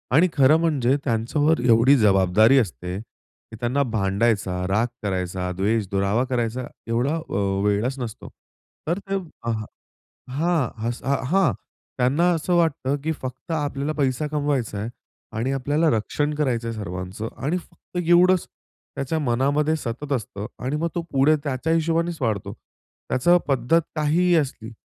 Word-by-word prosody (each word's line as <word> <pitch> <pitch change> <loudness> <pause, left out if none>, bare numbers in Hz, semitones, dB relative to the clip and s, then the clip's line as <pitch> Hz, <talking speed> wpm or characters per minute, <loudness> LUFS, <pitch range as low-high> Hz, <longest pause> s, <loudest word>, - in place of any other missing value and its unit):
आणि 170 +5 +6
खरं 140 +2 +5
म्हणजे 140 -6 +2
त्यांच्यावर 145 +6 +1
एवढी 120 +3 +6
जबाबदारी 105 +3 +4
असते 90 -4 -3
की 110 +1 -17
त्यांना 125 +4 0
भांडायचा, 100 -4 0
राग 105 +5 +2 0.2
करायचा, 90 -2 -2
द्वेष, 105 +2 +1
दुरावा 100 +4 +1
करायचा 120 0 -1 0.2
एवढा 120 +7 +1
अ, 165 0 -6 0.3
वेळच 110 +7 0
नसतो. 120 -2 -6 0.6
तर 170 +4 0
ते, 195 - 0 0.3
अ 115 - -1 0.8
हां, 155 -1 +1 0.2
असं 120 +2 -6 0.2
हां, 175 - +3 0.4
त्यांना 140 +8 +3
असं 170 +2 0
वाटतं 155 -5 +1
की 160 - 0
फक्त 130 +2 -7
आपल्याला 145 -2 -1
पैसा 140 0 0
कमवायचा 145 -7 -1
आहे 110 +3 -3 0.5
आणि 120 +4 0
आपल्याला 145 +5 +1
रक्षण 145 +6 0
करायचं 125 -6 0
आहे 115 - -5
सर्वांचं 95 +2 -5
आणि 150 +7 -1
फक्त 180 0 -11
एवढंच 180 +1 +4 0.5
त्याच्या 140 +4 -2
मनामध्ये 145 +4 +1
सतत 140 0 -5
असतं 105 -4 -4 0.2
आणि 135 +3 -1
मग 165 +2 0
तो 170 - 0
पुढे 140 +3 +4
त्याच्या 145 +3 -1
हिशोबानेच 165 +1 0
वाढतो. 110 -6 -1 0.6
त्याचं 175 +8 +4
पद्धत 135 +4 +2
काहीही 165 +4 +2
असली, 130 -7 -1
130 Hz, 140 wpm, -23 LUFS, 115-155 Hz, 0.8 s, आणि